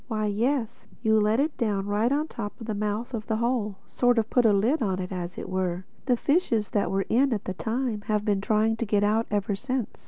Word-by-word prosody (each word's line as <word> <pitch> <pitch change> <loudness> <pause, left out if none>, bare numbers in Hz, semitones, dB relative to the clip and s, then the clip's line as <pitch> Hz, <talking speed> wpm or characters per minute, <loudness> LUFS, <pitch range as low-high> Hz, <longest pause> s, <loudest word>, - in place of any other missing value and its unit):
Why 215 -3 -1
yes: 235 +3 -1 0.2
you 220 -1 +4
let 215 +3 +2
it 295 +1 +1
down 205 -5 0
right 210 +4 +1
on 300 +2 +1
top 205 -5 -6
of 225 - -7
the 220 - -2
mouth 210 +4 -2
of 220 -2 -4
the 220 - 0
Hole—sort 235 +1 0
of 225 0 0
put 245 -2 +3
the 220 - +6
lid 230 +10 +2
on, 190 -4 0
as 180 -1 -5
it - - -5
were. 185 -1 -2 0.2
The 250 -2 +3
fishes 240 - +1
that 205 - 0
were 195 0 0
in 265 +4 +3
it - - +3
at 205 - -6
the 185 - -2
time 225 +2 -2
have 210 -1 0
been 200 -3 +1
trying 220 +2 +2
to 230 - -2
get 205 0 +2
out 220 +2 +2
ever 205 0 0
since. 255 +2 -3
215 Hz, 240 wpm, -26 LUFS, 205-240 Hz, 0.2 s, the